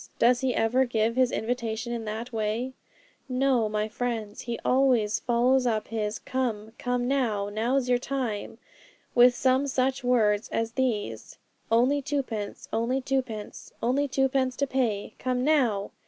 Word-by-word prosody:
Does 245 +1 +4
he 260 -2 0
ever 230 +4 +3
give 230 -1 0
his 255 -1 +3
invitation 230 0 -2
in 230 -1 -4
that 225 +3 -5
way? 225 +4 -2 0.6
No, 255 -3 +2
my 210 0 -1
friends; 220 -2 -4
he 235 -1 -4
always 250 -5 +3
follows 250 +2 +2
up 220 -2 -1
his 215 -1 -2
"Come, 225 -5 -3
come 245 0 -1
now! 225 -7 0
now's 240 +5 0
your 245 -1 +3
time!" 250 -5 -3 0.6
with 245 0 +6
some 260 +2 +2
such 260 0 0
words 220 -4 +2
as 225 0 -1
these, 210 - -2 0.3
"Only 255 +5 +3
twopence; 255 -8 -3
only 235 +4 +1
twopence; 255 -6 -4
only 270 +5 +2
twopence 265 -1 +1
to 280 - 0
pay! 240 -7 -1
Come 250 0 -1
now!" 250 -9 +2
245 Hz, 145 wpm, -27 LUFS, 220-260 Hz, 0.6 s, with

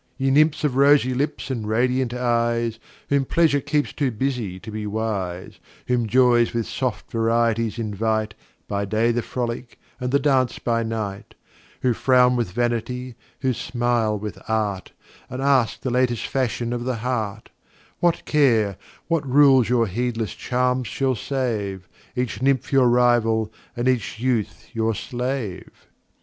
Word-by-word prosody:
Ye 135 0 +1
Nymphs 155 +3 +3
of 145 -4 +1
rosy 140 -2 +5
Lips 140 +1 -2
and 115 -5 -3
radiant 125 +3 +1
Eyes, 120 -2 0 0.3
Whom 140 -1 +3
Pleasure 150 0 +2
keeps 145 +2 -1
too 140 -2 0
busy 115 -6 -3
to 110 +3 -9
be 105 0 -4
wise, 100 -4 -3 0.3
Whom 120 -2 0
Joys 120 0 +4
with 115 -1 0
soft 130 -4 -3
Varieties 115 0 +1
invite 110 0 -1 0.3
By 100 0 -1
Day 110 +3 +1
the 120 +1 0
Frolick, 120 0 -4 0.2
and 125 -1 -2
the 140 - +4
Dance 135 -3 +2
by 115 -1 0
Night, 110 -3 -4 0.5
Who 125 -2 +3
frown 125 +1 +4
with 120 -6 -1
Vanity, 120 +3 -2 0.3
who 130 -2 +1
smile 120 -3 0
with 105 0 -6
Art, 105 -4 -1 0.4
And 130 - -6
ask 135 -4 +2
the 130 - -2
latest 125 -2 +1
Fashion 120 -2 -1
of 120 -1 -3
the 130 0 -1
Heart, 110 -4 -3 0.5
What 175 -1 +1
Care, 115 -10 +3 0.3
what 165 -3 +1
Rules 135 -3 +5
your 120 -2 +3
heedless 115 +1 -2
Charms 125 0 0
shall 135 -1 0
save, 105 -7 -3 0.3
Each 125 -4 -2
Nymph 135 0 +1
your 130 -2 +5
Rival, 115 -3 +2 0.2
and 120 +1 0
each 125 -3 0
Youth 120 -4 -1
your 115 -1 0
Slave? 125 -4 -4
120 Hz, 150 wpm, -23 LUFS, 110-130 Hz, 0.5 s, rosy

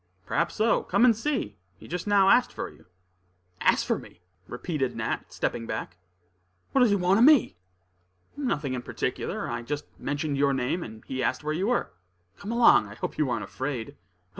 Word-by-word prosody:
"Perhaps 170 0 0
so; 225 +2 +2
come 240 - +3
and 235 -3 +5
see. 230 - -2 0.2
He - - -13
just 180 +3 -4
now 200 -2 +5
asked 250 - +5
for - - -5
you." 80 +3 -21 0.7
"Asked - - +3
for - - 0
me?" - - -15 0.3
repeated 135 +1 -3
Nat, - - -3
stepping 115 -1 -2
back. 95 - -5 0.7
"What 270 - +3
does 245 - +6
he 200 - +3
want 190 +2 +3
of 240 - +7
me?" 285 - +5 0.8
"Nothing 150 - -2
in 125 - -3
particular. - - -3
I 120 0 -3
just 145 +5 -4
mentioned 145 0 -2
your 140 -1 +3
name, 130 +7 -1
and 110 -6 -9
he 130 0 -4
asked - - -1
where 155 +1 -1
you 185 +6 -1
were. 245 0 0 0.5
Come 200 +2 -5
along; 235 - +5
I 105 - -11
hope - - -5
you 145 -5 +1
ain't 120 - -1
afraid?" 130 -4 -5
155 Hz, 190 wpm, -27 LUFS, -, 0.8 s, of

